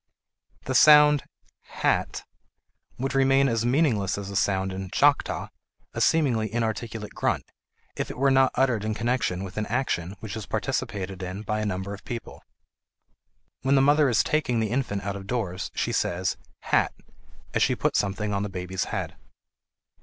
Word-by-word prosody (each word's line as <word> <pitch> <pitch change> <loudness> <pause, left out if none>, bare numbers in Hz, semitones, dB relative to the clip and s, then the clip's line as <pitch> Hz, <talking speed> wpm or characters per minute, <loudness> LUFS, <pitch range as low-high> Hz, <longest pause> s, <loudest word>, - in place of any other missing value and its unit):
The 130 - -3
sound 150 +1 +7 0.6
h - - +1
a - - +3
t - - -7 0.7
would 135 +2 -2
remain 135 0 +4
as 115 -3 0
meaningless 120 - +2
as 100 -1 -6
a - - -6
sound 95 -1 +1
in 95 0 -5
Choctaw, 145 +7 +2 0.4
a - - -3
seemingly 125 -9 +2
inarticulate 115 -1 -3
grunt, - - -1 0.5
if - - -3
it - - -7
were 135 +1 +3
not 135 0 +4
uttered 125 -5 +2
in 110 0 -2
connection 115 -6 -1
with 95 +1 -8
an 110 - -1
action 100 -7 -1
which 110 -1 -6
is 110 -3 -6
participated 95 -2 -3
in 95 +3 -5
by 110 0 -2
a 105 - -1
number 95 0 -3
of 100 - -10
people. 120 -1 -7 1.2
When 135 +1 +2
the 135 - +5
mother 145 0 +4
is 120 - +3
taking 140 -6 0
the 110 -1 -1
infant 120 -6 -1
out 100 +1 -3
of 95 -1 -8
doors, 100 -6 -3
she - - -1
says 90 +1 0 0.3
"hat" - - +1 0.6
as - - +1
she - - +3
puts - - +1
something 105 +1 -2
on 100 - 0
the 105 - -3
baby's 90 0 -3
head. - - -4
110 Hz, 175 wpm, -26 LUFS, 100-130 Hz, 1.2 s, sound